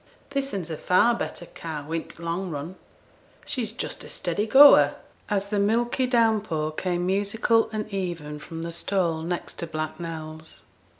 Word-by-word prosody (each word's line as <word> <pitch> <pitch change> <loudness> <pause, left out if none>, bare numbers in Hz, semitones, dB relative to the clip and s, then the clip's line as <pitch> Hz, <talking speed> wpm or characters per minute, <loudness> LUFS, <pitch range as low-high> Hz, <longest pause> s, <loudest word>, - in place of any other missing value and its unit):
This'n 275 -8 -1
's 165 - -8
a 155 - -3
far 205 +9 +4
better 205 -6 -4
cow 155 -3 -7
i' 165 - +1
t' 170 - -12
long 175 +3 -2
run, 150 +3 -5 0.7
she's 235 -5 -2
just 230 - -5
a - - -10
steady 210 +2 -2
goer,' 280 +5 +8 0.3
as 200 -1 0
the 205 -1 0
milky 240 +5 +1
down 225 -3 +3
pour 155 -6 -2
came 175 +2 -2
musical 205 +4 +2
and 215 -1 -3
even 170 -7 -4
from 165 +2 -7
the 170 - -4
stall 170 -1 0
next 175 +2 -4
to 170 - -3
Black 155 0 -4
Nell's. 160 -1 -8
180 Hz, 170 wpm, -25 LUFS, 160-215 Hz, 0.7 s, goer